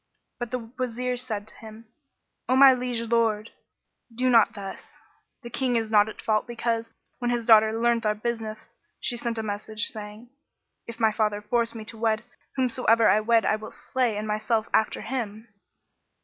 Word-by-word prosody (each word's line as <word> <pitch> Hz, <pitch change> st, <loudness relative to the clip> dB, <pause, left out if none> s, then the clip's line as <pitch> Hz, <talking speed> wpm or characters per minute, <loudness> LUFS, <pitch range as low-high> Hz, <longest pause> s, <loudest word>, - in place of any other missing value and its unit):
But 240 Hz, -1 st, -4 dB
the 255 Hz, -, -2 dB, 0.2 s
Wazir 250 Hz, 0 st, -2 dB
said 220 Hz, -4 st, -4 dB
to -, -, -9 dB
him, 220 Hz, 0 st, -12 dB, 0.6 s
"O 255 Hz, -, +4 dB
my 270 Hz, 0 st, +8 dB
liege 250 Hz, -2 st, -2 dB
Lord, 225 Hz, -2 st, 0 dB, 0.6 s
do 250 Hz, +2 st, +1 dB
not 230 Hz, -3 st, +5 dB
thus: 195 Hz, -1 st, -9 dB, 0.4 s
the 235 Hz, -, -7 dB
King 255 Hz, 0 st, 0 dB
is 225 Hz, -1 st, -1 dB
not 210 Hz, 0 st, +5 dB
at -, -, -10 dB
fault 215 Hz, +1 st, +1 dB
because, 230 Hz, -1 st, -2 dB, 0.3 s
when 245 Hz, -1 st, -1 dB
his 240 Hz, -1 st, -1 dB
daughter 220 Hz, 0 st, +5 dB
learnt 235 Hz, 0 st, +2 dB
our 210 Hz, -, +1 dB
business, 220 Hz, -1 st, -5 dB, 0.3 s
she 245 Hz, -, -1 dB
sent 235 Hz, -1 st, -3 dB
a 220 Hz, -, -2 dB
message 215 Hz, +1 st, -2 dB
saying, 215 Hz, +2 st, -9 dB, 0.6 s
'If 235 Hz, 0 st, -8 dB
my 220 Hz, -1 st, +4 dB
father 210 Hz, -1 st, 0 dB
force 230 Hz, +2 st, -1 dB
me 220 Hz, -1 st, -7 dB
to 225 Hz, 0 st, -6 dB
wed, 220 Hz, 0 st, +1 dB, 0.3 s
whomsoever 235 Hz, -3 st, +3 dB
I 215 Hz, -, +5 dB
wed 225 Hz, +1 st, +3 dB
I 215 Hz, -, +2 dB
will 215 Hz, 0 st, -9 dB
slay 245 Hz, -5 st, -2 dB
and 215 Hz, +1 st, -4 dB
myself 215 Hz, +1 st, 0 dB
after 220 Hz, -, +1 dB
him.' 225 Hz, -3 st, -5 dB
225 Hz, 175 wpm, -26 LUFS, 215-240 Hz, 0.6 s, my